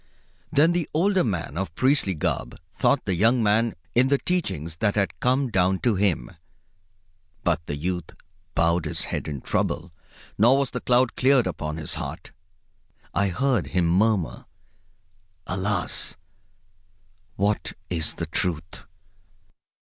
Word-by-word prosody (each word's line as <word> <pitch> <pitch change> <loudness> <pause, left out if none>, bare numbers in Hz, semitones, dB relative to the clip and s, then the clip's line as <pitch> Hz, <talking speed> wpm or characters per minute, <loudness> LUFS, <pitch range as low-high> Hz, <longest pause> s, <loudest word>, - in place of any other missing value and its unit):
Then 155 +4 +4
the 175 -3 -1
older 190 +3 +3
man 85 - -2
of 95 -4 -4
priestly 130 - +2
garb 75 - -2 0.2
taught 140 - +2
the 95 - 0
young 115 +7 +3
man 110 +1 +2 0.2
in 125 +2 +4
the 140 +1 +3
teachings 85 - -2
that 105 0 +1
had 100 -5 0
come 130 0 +1
down 95 -1 +2
to 120 - +2
him. 95 -10 0 1.1
But 85 -2 +1
the 75 - -2
youth 90 +4 -3 0.5
bowed 85 0 +2
his 75 - -1
head - - -4
in 70 -4 -5
trouble, 85 0 -1 0.5
nor 120 +6 +6
was 140 -2 0
the - - -4
cloud 125 0 +2
cleared 130 -2 +4
upon 75 +1 -3
his 80 -2 -3
heart. - - -6 0.8
I 100 - +2
heard 115 - 0
him 90 +4 +1
murmur, 95 0 +1 1.0
"Alas! 95 0 -1 1.2
what 100 +2 0 0.2
is 80 -3 -1
the 85 - -3
Truth?" 80 0 -2
100 Hz, 135 wpm, -25 LUFS, 85-125 Hz, 1.2 s, nor